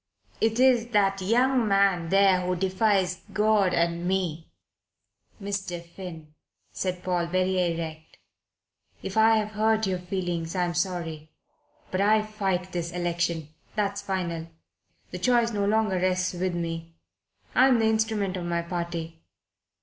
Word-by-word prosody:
It 225 +1 +1
is 250 -3 +4
that 195 -1 +2
young 245 +4 +2
man 195 -4 +2
there 195 -1 +4
who 180 0 -1
defies 190 0 +1
God 210 -2 +3
and 170 0 0
me." 175 -4 -2 0.9
"Mr. 195 -3 -4
Finn," 170 -3 -10 0.4
said 180 -1 -3
Paul, 175 -2 0
very 185 0 +1
erect, 160 -1 -6 0.9
"if - - -5
I 220 +1 +5
have 215 -1 -1
hurt 220 +1 +2
your 185 -2 -1
feelings 175 -2 -3
I 180 - +1
am 175 - -3
sorry. 165 -5 -3 0.6
But 185 - 0
I 215 +1 +4
fight 195 -4 -2
this 170 -1 -3
election. 170 -3 -2 0.3
That's 200 -1 -1
final. 175 -4 -3 0.6
The 180 - -5
choice 235 +3 +3
no 205 -2 0
longer 215 -2 +2
rests 185 0 0
with 180 0 -2
me. 165 -1 -4 0.6
I'm 260 -1 +5
the 225 - +2
instrument 220 -3 +1
of 175 - -4
my 170 0 -1
party. 170 -2 -5
185 Hz, 140 wpm, -26 LUFS, 170-210 Hz, 0.9 s, I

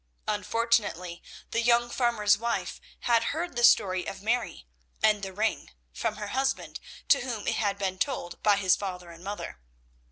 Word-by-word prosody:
Unfortunately 205 -4 0 0.3
the 230 - +1
young 240 0 +4
farmer's 225 -5 +3
wife 235 +2 -3 0.2
had 230 -1 +3
heard 340 -1 -3
the 240 - 0
story 185 -6 +4
of 195 0 -6
Mary 230 - -1 0.4
and 210 -1 +4
the 195 -1 -5
ring 215 +4 -1 0.2
from - - -2
her 210 -1 -6
husband, 270 +3 -1 0.3
to 280 - +6
whom 240 -4 -4
it - - 0
had 200 -2 0
been 190 -2 -2
told 215 -10 -2
by 205 -1 +5
his 190 -2 +4
father 180 -3 -6
and 170 +1 -13
mother. 200 - -6
210 Hz, 165 wpm, -28 LUFS, 190-235 Hz, 0.4 s, to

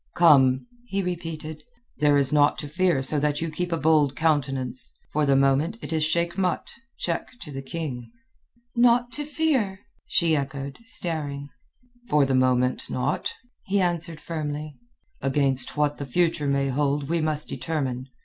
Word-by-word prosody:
"Come," 135 -6 +5 0.2
he 195 -3 -1
repeated, 165 -3 -5 0.4
"there 145 -1 +4
is 140 0 +3
naught 145 -1 +4
to 145 - -5
fear 170 -3 +1
so 145 +3 +2
that 145 0 0
you 165 -1 -3
keep 175 +3 -3
a 165 - +1
bold 150 -3 +3
countenance. 135 -6 0 0.2
For 150 -1 +1
the 140 - +4
moment 135 +9 +2
it - - -3
is 160 -1 +2
Sheik 170 +3 +1
Mat—check 230 +3 -3
to 150 - -7
the 135 -1 -5
king." 135 -4 -5 0.7
"Naught 240 0 +4
to 295 - -3
fear?" 280 -11 0 0.3
she 165 -3 +3
echoed, 140 -1 -4
staring. 150 - -2 0.6
"For 150 -2 +4
the 135 - 0
moment, 130 0 +2
naught," 130 +4 -1 0.4
he 200 +1 +2
answered 170 -3 -1
firmly. 150 -2 -4 0.5
"Against 135 0 +1
what 150 -1 +1
the 140 - -4
future 165 +1 +1
may 140 0 +1
hold, 140 +1 0
we 165 +1 0
must 155 -1 -1
determine. 130 -6 -3
150 Hz, 155 wpm, -25 LUFS, 140-170 Hz, 0.7 s, Come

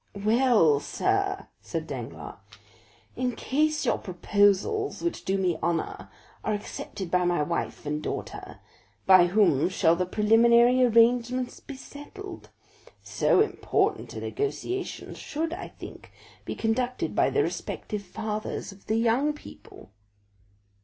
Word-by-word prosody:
"Well, 215 - +4
sir," 390 - -1 0.2
said - - -4
Danglars, - - -7 0.8
"in 250 -2 -1
case 305 +5 0
your - - +1
proposals, 205 - +1
which 340 - -2
do 195 +1 +1
me 180 -4 0
honor, 165 -1 -2 0.3
are 215 - 0
accepted 195 -3 -7
by 180 0 +3
my 175 -3 +1
wife 170 0 -3
and 150 +1 -2
daughter, - - -6 0.4
by 185 -2 +7
whom 175 -5 +3
shall 165 -2 +3
the 180 +1 -1
preliminary 235 +5 +5
arrangements 245 +1 +3
be 280 - -9
settled? 340 +8 -10 0.5
So - - +2
important - - 0
a - - -5
negotiation 395 -2 -3
should, 320 +2 -4
I 360 - -6
think, - - -12 0.3
be - - -4
conducted 245 +3 -1
by - - +3
the - - +2
respective 210 -1 -4
fathers 210 +2 -5
of 195 0 -17
the 220 - +1
young 240 +6 +2
people." 295 - -14
225 Hz, 125 wpm, -27 LUFS, 185-270 Hz, 0.8 s, by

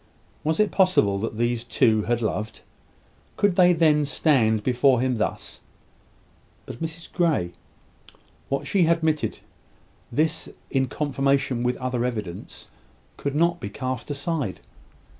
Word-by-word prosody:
Was 160 +4 0
it 215 - +3
possible 185 - +3
that 110 +1 -4
these 120 0 0
two 110 -2 +2
had 120 0 0
loved? 110 0 -3 0.8
Could 205 -3 +2
they 180 -1 +6
then 155 -3 +3
stand 125 -7 +2
before 125 +1 +3
him 125 -1 0
thus? - - -3 1.0
But 120 - -9
Mrs 165 +1 -6
Grey 155 - +1 1.0
what 140 - -1
she 185 -5 +2
admitted! 160 -2 0 0.7
this, 160 +6 0 0.2
in 135 -1 +1
confirmation 135 -2 0
with 125 0 0
other 125 -2 -2
evidence, 105 -8 -5 0.5
could 140 0 -4
not 170 +2 +2
be 100 - -5
cast 130 +4 -4
aside. 145 - -3
135 Hz, 125 wpm, -24 LUFS, 120-160 Hz, 1.0 s, they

